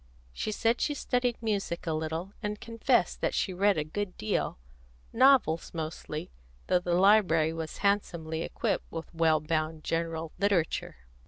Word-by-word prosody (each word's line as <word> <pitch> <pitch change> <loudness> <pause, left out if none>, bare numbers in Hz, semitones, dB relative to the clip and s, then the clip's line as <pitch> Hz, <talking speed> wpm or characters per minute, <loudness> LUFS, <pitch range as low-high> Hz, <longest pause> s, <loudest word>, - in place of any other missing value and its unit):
She 215 - -3
said 230 +3 +1
she 295 - 0
studied 245 -3 0
music 200 -6 -2
a 165 - -1
little, 160 +5 -3
and 210 0 -3
confessed 230 -2 +1
that - - 0
she 190 - 0
read 200 +1 +3
a 155 - +1
good 185 +5 -4
deal, 105 - -1 0.6
novels 250 -12 +4
mostly, 155 - -5 0.3
though 180 - +3
the 175 -1 0
library 180 -5 +4
was 160 -1 -5
handsomely 170 -5 0
equipped - - -2
with 165 +1 -7
well 160 -1 +3
bound 155 0 -2
general 165 -1 -2
literature. 170 - 0
170 Hz, 150 wpm, -29 LUFS, 160-205 Hz, 0.6 s, novels